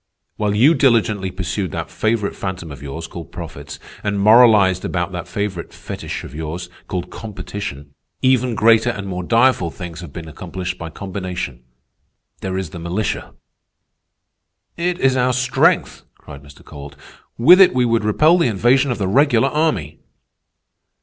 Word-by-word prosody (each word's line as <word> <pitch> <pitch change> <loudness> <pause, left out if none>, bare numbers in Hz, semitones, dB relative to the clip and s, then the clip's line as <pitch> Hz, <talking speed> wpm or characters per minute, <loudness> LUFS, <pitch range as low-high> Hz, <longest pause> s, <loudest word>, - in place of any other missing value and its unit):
While 105 -1 -1
you 130 +10 +5
diligently 115 - +2
pursued 95 +1 -3
that - - -5
favorite 110 -2 -1
phantom 95 -4 -5
of 70 - -10
yours, 70 -1 -6
called - - -9
profits, - - -8 0.3
and 100 -1 -1
moralized 105 -4 +5
about 85 0 -2
that 90 -1 -6
favorite 95 -2 -4
fetich - - -7
of - - -10
yours, 80 +3 -6 0.2
called 90 -1 -4
competition, 95 -9 -7 0.3
even 130 -2 +2
greater 115 +2 +4
and 100 -4 -4
more 90 -2 -4
direful 115 -2 +2
things 85 0 -8
have 85 -5 -9
been 80 +2 -8
accomplished 90 +2 -6
by 80 - -6
combination. 90 -8 -6 0.8
There 95 -1 -3
is 95 -5 -4
the 85 - -8
militia." 90 +6 -3 1.4
"It 175 +1 -1
is 130 -1 +3
our 130 0 +2
strength!" 125 0 +1
cried 70 -2 -12
Mr. 70 0 -17
Kowalt. 70 0 -10 0.4
"With 180 +11 +7
it 185 - +6
we 125 -1 +3
would 115 -2 +1
repel 155 - +4
the 165 - +3
invasion 120 +6 +2
of 125 - -1
the 100 - -1
regular 135 +3 +3
army." 130 - -1
100 Hz, 155 wpm, -19 LUFS, 90-120 Hz, 1.4 s, With